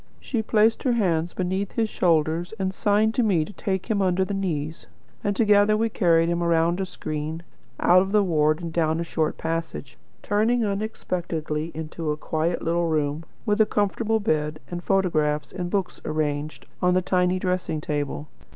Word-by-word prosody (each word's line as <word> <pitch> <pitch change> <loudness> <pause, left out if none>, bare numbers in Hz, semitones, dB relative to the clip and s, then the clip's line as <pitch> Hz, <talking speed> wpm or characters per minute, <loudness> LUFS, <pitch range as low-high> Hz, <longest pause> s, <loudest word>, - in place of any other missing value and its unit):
She 235 -4 -2
placed 220 +1 +3
her 255 - +1
hands 175 -7 0
beneath 190 +2 -2
his 225 -1 +1
shoulders, 170 0 +1
and 190 -1 -1
signed 210 +2 +2
to 250 - +1
me 185 -9 +2
to 210 - -11
take 190 -2 -2
him 215 -3 0
under 190 0 +2
the 200 - -4
knees, 165 -5 -3 0.4
and 205 -1 0
together 210 0 +4
we 225 +1 +1
carried 165 -6 +3
him 170 0 0
round 170 +1 +2
a 190 - -2
screen, 155 -1 -5 0.4
out 180 +1 +6
of 195 +1 -2
the 210 -1 +4
ward, 155 -2 +2
and 165 -1 -5
down 160 -1 +1
a - - -1
short 160 -2 -1
passage; 165 -4 -4 0.2
turning 220 +3 +2
unexpectedly 175 -6 -3
into 160 0 -4
a 150 - -1
quiet 160 +2 -1
little 170 +1 +1
room, 155 0 -1 0.2
with 210 0 +2
a 215 - +4
comfortable 220 +2 0
bed, 155 -6 -1
and 175 0 -4
photographs 155 -6 +1
and 180 -2 -4
books 190 -1 -2
arranged 150 -1 -2 0.2
on 180 0 +3
the 185 - +2
tiny 180 0 +2
dressing 180 -4 -1
table. 145 0 -3
175 Hz, 180 wpm, -24 LUFS, 160-200 Hz, 0.4 s, out